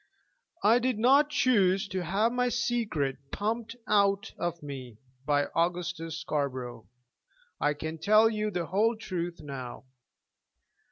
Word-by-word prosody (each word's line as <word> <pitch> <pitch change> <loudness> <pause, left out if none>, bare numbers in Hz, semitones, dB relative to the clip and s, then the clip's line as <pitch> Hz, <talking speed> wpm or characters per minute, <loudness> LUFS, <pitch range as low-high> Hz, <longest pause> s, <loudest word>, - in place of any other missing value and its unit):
"I 225 +4 +5
did 250 -2 0
not 275 +6 +5
choose 205 -10 +3
to 185 -2 -2
have 200 +7 +1
my 250 0 +1
secret 220 - -1
pumped 230 +2 -2
out 200 0 +2
of 170 -2 -3
me 130 -6 -8 0.3
by 145 -1 +3
Augustus 170 -1 -1
Scarborough. 130 -7 -3 0.7
I 145 0 +1
can 160 +2 -5
tell 215 +4 +5
you 215 -1 -1
the 175 -4 -2
whole 210 +8 +2
truth 175 -5 -4
now. 135 -4 -7
185 Hz, 125 wpm, -29 LUFS, 155-225 Hz, 0.7 s, I